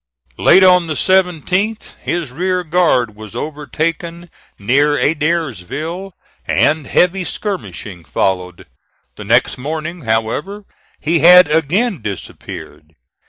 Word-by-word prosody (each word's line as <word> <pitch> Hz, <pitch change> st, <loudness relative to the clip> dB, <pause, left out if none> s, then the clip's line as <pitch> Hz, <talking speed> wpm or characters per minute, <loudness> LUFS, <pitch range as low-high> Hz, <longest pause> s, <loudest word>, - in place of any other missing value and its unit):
Late 190 Hz, -, +6 dB
on 180 Hz, -2 st, +5 dB
the 155 Hz, -, -3 dB
17th, 190 Hz, +4 st, 0 dB
his 170 Hz, -7 st, -3 dB
rear 180 Hz, +5 st, -1 dB
guard 155 Hz, -10 st, +1 dB
was 110 Hz, 0 st, -11 dB
overtaken 165 Hz, +4 st, -4 dB, 0.3 s
near 140 Hz, +8 st, +2 dB
Adairsville, 160 Hz, -, -2 dB, 0.3 s
and 155 Hz, -2 st, +1 dB
heavy 180 Hz, +1 st, +2 dB
skirmishing 150 Hz, -, -6 dB
followed. 90 Hz, +5 st, -2 dB, 0.5 s
The 105 Hz, -, -9 dB
next 120 Hz, +4 st, +2 dB
morning, 160 Hz, +5 st, -5 dB
however, 130 Hz, -, -2 dB, 0.3 s
he 165 Hz, +2 st, +1 dB
had 180 Hz, +1 st, +8 dB
again 170 Hz, -, +1 dB
disappeared. 80 Hz, -5 st, -8 dB
160 Hz, 105 wpm, -17 LUFS, 125-180 Hz, 0.5 s, had